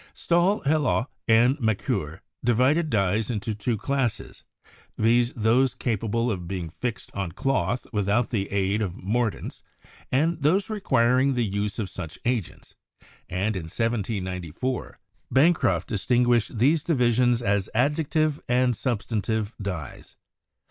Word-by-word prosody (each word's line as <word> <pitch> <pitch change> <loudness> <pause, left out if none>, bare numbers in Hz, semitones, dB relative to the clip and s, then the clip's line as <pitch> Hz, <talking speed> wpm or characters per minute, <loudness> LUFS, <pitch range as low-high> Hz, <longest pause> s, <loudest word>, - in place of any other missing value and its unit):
Stahl, 175 +5 +2
Hellot 145 -4 +1 0.2
and 120 +5 +4
Macquer 100 - -1 0.2
divided 130 +8 +3
dyes 105 -2 +1
into 110 -1 -2
two 110 +2 -2
classes, 135 0 -2 0.5
viz., 120 +2 +3
those 120 +3 +2
capable 115 +1 -1
of 90 -4 -4
being 85 -3 -4
fixed 120 +5 -5
on 95 -5 -4
cloth 120 -1 -1
without 105 +3 +1
the 100 -5 -2
aid 100 +1 0
of 95 -5 -2
mordants, 115 +3 -2 0.5
and 160 +5 +1
those 190 +9 +2
requiring 130 - +2
the 120 -2 +1
use 100 0 -2
of 110 -4 -2
such 90 -3 -7
agents, 120 -7 -3 0.6
and 100 +4 -1
in 90 -4 -4
1794, 100 - -3 0.3
Bancroft 130 - +3
distinguished 120 +1 +1
these 145 +7 +3
divisions 125 -5 +2
as 100 -1 0
adjective 150 +3 +1
and 125 0 +3
substantive 110 -2 -2
dyes. 90 -8 -6
115 Hz, 120 wpm, -25 LUFS, 100-130 Hz, 0.6 s, and